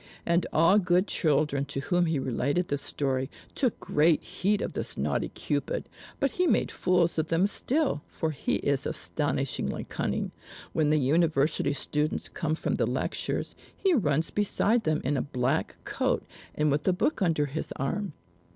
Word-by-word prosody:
And 170 0 +2
all 165 +6 +5
good 180 0 +3
children 150 -6 +1
to 140 -1 -3
whom 175 +5 +1
he 160 -2 +1
related 135 +6 0
this 145 0 -1
story, 135 -2 -1 0.2
took 255 -5 0
great 155 +1 +3
heed 190 +3 0
of - - -4
this - - -4
naughty - - 0
Cupid; - - -2 0.3
but 275 - +1
he 360 0 +1
made - - +2
fools 175 -2 +2
of 155 - 0
them 165 +4 +3
still, 260 - 0
for 160 - -2
he 145 - -1
is 140 -1 0
astonishingly 140 -4 -2
cunning. - - -2 0.4
When 155 -2 +2
the 155 - +4
university 150 0 +2
students 150 +2 -1
come 155 -1 -1
from - - -2
the - - +1
lectures, - - -2 0.2
he 385 -2 +2
runs 160 - +1
beside 210 +2 +2
them 155 0 +1
in 140 +2 0
a - - +1
black 135 +2 -1
coat, - - -1 0.3
and 150 -1 +2
with 145 +1 0
a 185 - +5
book 225 +8 0
under 165 -5 +2
his 145 +3 -4
arm. 185 +7 -2
155 Hz, 170 wpm, -28 LUFS, 145-180 Hz, 0.4 s, all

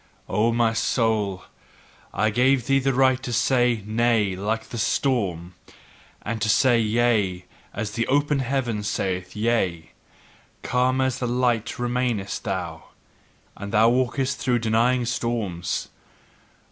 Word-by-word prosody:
O 105 +4 +1
my 115 -1 +2
soul, 110 -5 0 0.7
I 110 +1 0
gave 125 +2 +2
thee 135 +1 +3
the 135 0 +1
right 130 0 +3
to 130 -2 -5
say 120 -2 +2
Nay 110 -3 +1
like 110 +4 -3
the 120 - -5
storm, 95 - -1 0.7
and 110 0 -4
to 110 - 0
say 120 +2 +4
Yea 110 -5 +1 0.3
as 105 0 -4
the 115 +2 -2
open 145 +1 +1
heaven 125 -4 -1
saith 95 -3 -3
Yea: 105 -7 -1 0.7
calm 130 +1 +1
as 130 -1 0
the 125 - -2
light 120 -1 0
remainest 120 -4 -2
thou, - - -4 0.7
and 100 +1 -8
now 110 +2 +5
walkest 130 +1 0
through 125 -3 +1
denying 120 +2 +1
storms. 115 -8 -2
115 Hz, 130 wpm, -24 LUFS, 105-125 Hz, 0.7 s, now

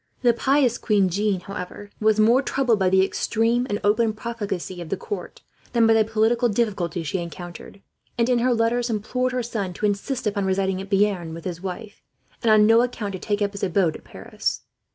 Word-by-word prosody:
The 240 -1 +5
pious 260 0 +2
queen, 200 -4 +2 0.3
however, 195 +1 -8
was 215 0 +3
more 230 +5 +5
troubled 255 -5 +1
by 190 -1 +3
the 190 0 +4
extreme 230 +5 0
and 205 0 -1
open 220 +2 +2
profligacy 205 -6 -5
of 165 - -8
the 195 - -1
court 410 - -7 0.3
than 235 -2 +4
by 225 - +5
the 225 -1 +4
political 225 +3 +1
difficulties 195 -7 -1
she 185 +5 -2
encountered 175 +3 -9 0.3
and, 235 0 +2
in 250 -1 +2
her 250 +2 +2
letters, 235 +1 +1
implored 250 +4 -1
her 250 -1 -1
son 210 -6 -3
to 210 - -3
insist 210 +6 -2
upon 200 -2 0
residing 190 0 0
at 195 - -9
Bearn 195 -5 +1
with 165 - -10
his 175 -2 -5
wife, 195 +3 -7 0.4
and 230 - +1
on 215 -1 +6
no 225 +2 +6
account 230 -5 -3
to 185 - -5
take 205 +1 -1
up 200 - -1
his 200 - -8
abode 180 -3 +1
at - - -11
Paris. - - -4
210 Hz, 200 wpm, -23 LUFS, 190-235 Hz, 0.4 s, on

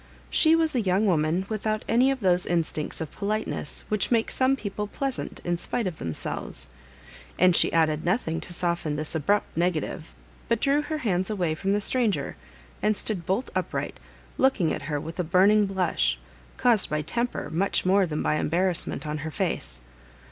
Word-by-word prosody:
She 320 0 +5
was 325 -1 +2
a 250 - +2
young 195 +1 +2
wo 185 -4 +4
man 160 +5 0
without 215 0 -2
any 245 +3 +4
of 270 -2 -1
those 180 -2 +3
instincts 165 -3 -1
of 160 - -4
politeness 210 -7 -3
which 215 -1 0
make 230 -2 +2
some 260 +1 +2
people 210 -4 -4
pleasant 270 +5 -4
in 175 0 0
spite 230 +6 -2
of 180 -4 -4
themselves; 75 -5 -5 0.7
and 180 -1 +5
she - - +4
added 160 -1 +2
nothing 170 -3 0
to - - -7
soften 170 -3 -1
this 155 0 -3
abrupt 185 +7 0
negative, 165 - -2 0.3
but 230 - +2
drew 280 +3 +3
her 310 +1 -3
hands 190 -9 0
away 180 -7 0
from 195 +5 -1
the 205 - +1
stranger 210 - 0 0.5
and 210 -1 +2
stood 185 -7 -3
bolt 200 +7 -1
upright, - - -3 0.4
looking 215 -12 +3
at - - -4
her, 145 -1 0
with 160 +4 -8
a - - +2
burning 200 +5 +4
blush, 170 - +1 0.4
caused 235 -5 +3
by 150 0 -1
temper 235 +10 -2
much 185 +4 0
more 190 0 +4
than 155 -1 -2
by 155 - +1
embarrassment, 175 +1 0
on 150 0 -3
her 155 +2 -4
face. 60 - -2
185 Hz, 180 wpm, -26 LUFS, 160-215 Hz, 0.7 s, She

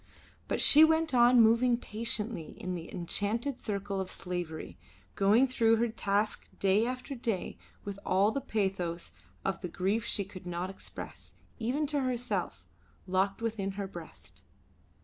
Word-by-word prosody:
But - - -1
she 305 +2 +8
went 320 -1 +3
on 240 0 +6
moving 235 +2 +4
patiently 220 -5 -4
in 185 - -3
the 170 -2 -6
enchanted 220 +9 -1
circle 200 -2 -2
of 185 - -5
slavery, 175 -3 -5 0.3
going 210 +6 +4
through 230 -3 +3
her 235 +1 +1
task 210 -1 -1
day 200 +4 +3
after 255 +2 -4
day 230 -7 -3 0.2
with 200 -1 -6
all 195 +3 +3
the 275 - -2
pathos 190 -7 -2 0.3
of 195 - -1
the 180 - -4
grief 195 +6 0
she 205 -3 -1
could 185 -2 -11
not 175 +2 -3
express, - - -9 0.2
even 255 +7 0
to 290 0 0
herself, 245 -2 -2 0.4
locked 195 +3 0
within 205 -4 -2
her 200 0 -3
breast. 160 - -11
205 Hz, 150 wpm, -31 LUFS, 190-235 Hz, 0.4 s, she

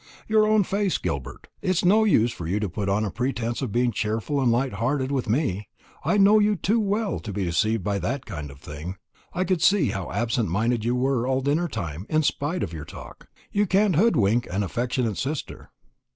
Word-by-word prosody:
"Your 215 -1 +4
own 215 -1 +4
face, 195 0 0
Gilbert. 70 -3 -5
It's 185 -1 +1
no 215 +4 +5
use 120 - +3
for 85 - -6
you 100 +5 0
to 105 - 0
put 100 +3 -3
on 105 +2 +1
a 100 - -3
pretence 120 -1 -2
of 130 -6 -3
being 120 +2 +2
cheerful 110 +6 -1
and 125 -3 +3
light 125 +1 +1
hearted 130 +5 -1
with 130 -5 -1
me. 105 - 0 0.4
I 210 - +2
know 205 +2 +6
you 210 0 +3
too 205 +6 +1
well 210 0 0
to 110 - -6
be 100 0 -2
deceived 95 +5 +1
by 100 +1 -1
that 125 +9 -3
kind 75 -2 -6
of 70 0 -13
thing 75 +6 -7 0.4
I 180 - -1
could 185 -2 0
see 175 -4 +4
how 95 -2 -4
absent 115 -3 0
minded 110 +5 0
you 120 +2 +1
were 125 -1 +1
all 130 0 +1
dinner 150 +6 +1
time, 90 - -5
in 155 0 +2
spite 150 +5 -1
of 85 - -4
your 80 -2 -6
talk. - - -11 0.2
You 205 0 +1
can't 195 0 +3
hoodwink 120 - +3
an 95 +3 -1
affectionate 120 +1 -1
sister." 145 +2 -4
125 Hz, 210 wpm, -25 LUFS, 105-175 Hz, 0.4 s, know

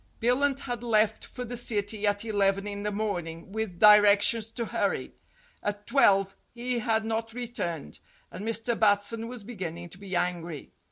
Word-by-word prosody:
Billunt 270 +4 +1
had 245 -3 -4
left 220 -2 +2
for 250 - -7
the 245 +1 -5
City 210 -3 0
at 205 +2 0
eleven 200 -2 +1
in 205 0 -5
the 210 - -1
morn 200 -5 -2
ing, 165 +3 -10
with 215 -4 -4
directions 210 +2 +6
to 235 - -3
hurry. - - -2 0.5
At 205 0 -4
twelve 195 -7 +3 0.2
he 245 0 -1
had 220 -1 0
not 225 +1 -3
re 245 0 -3
turned, 170 - -4 0.3
and 200 - -7
Mr. 225 +1 0
Batson 215 +2 +2
was 240 -3 -8
beginning 175 -6 -6
to 180 - -12
be 195 -2 -5
angry. 175 -3 -3
210 Hz, 170 wpm, -28 LUFS, 195-230 Hz, 0.5 s, directions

